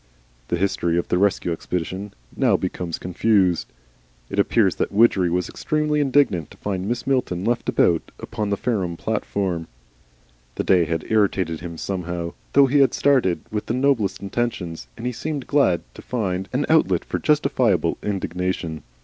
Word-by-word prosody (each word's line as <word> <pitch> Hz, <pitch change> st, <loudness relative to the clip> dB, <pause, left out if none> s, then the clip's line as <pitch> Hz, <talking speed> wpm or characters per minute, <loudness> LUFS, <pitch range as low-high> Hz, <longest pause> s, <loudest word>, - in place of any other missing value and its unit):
The -, -, 0 dB
history 85 Hz, -2 st, 0 dB
of 85 Hz, -, -1 dB
the 90 Hz, -, +2 dB
Rescue 100 Hz, -3 st, +1 dB
Expedition 90 Hz, +4 st, -4 dB, 0.2 s
now -, -, +3 dB
becomes 85 Hz, -2 st, -3 dB
confused. 90 Hz, -1 st, +1 dB, 0.6 s
It 100 Hz, -, -2 dB
appears 100 Hz, -1 st, +3 dB
that -, -, -1 dB
Widgery 100 Hz, -4 st, +4 dB
was 90 Hz, +1 st, 0 dB
extremely 150 Hz, 0 st, -1 dB
indignant 135 Hz, -, +2 dB
to -, -, -16 dB
find 95 Hz, -2 st, -3 dB
Mrs. 120 Hz, 0 st, -2 dB
Milton 125 Hz, -9 st, 0 dB
left 120 Hz, +1 st, 0 dB
about 85 Hz, -2 st, +2 dB
upon 110 Hz, -3 st, -4 dB
the 100 Hz, -, 0 dB
Fareham 95 Hz, -9 st, -1 dB
platform. 95 Hz, -6 st, -2 dB, 0.9 s
The -, -, -1 dB
day 90 Hz, -3 st, +4 dB
had 80 Hz, 0 st, -2 dB
irritated 95 Hz, -6 st, +1 dB
him 85 Hz, -1 st, -7 dB
somehow, 85 Hz, -2 st, -4 dB, 0.2 s
though 140 Hz, 0 st, +7 dB
he 140 Hz, +2 st, +3 dB
had 135 Hz, -, +4 dB
started 130 Hz, -11 st, +2 dB
with 105 Hz, -1 st, -3 dB
the 115 Hz, -, 0 dB
noblest 120 Hz, -8 st, +1 dB
intentions, 95 Hz, -, -3 dB
and 115 Hz, -, -7 dB
he 125 Hz, -, 0 dB
seemed 145 Hz, +2 st, -4 dB
glad 140 Hz, -12 st, +3 dB
to -, -, -11 dB
find 95 Hz, -6 st, -2 dB
an 135 Hz, +3 st, 0 dB
outlet 160 Hz, 0 st, +3 dB
for -, -, -3 dB
justifiable 125 Hz, -, +2 dB
indignation. 90 Hz, -5 st, -3 dB
100 Hz, 160 wpm, -22 LUFS, 90-120 Hz, 0.9 s, though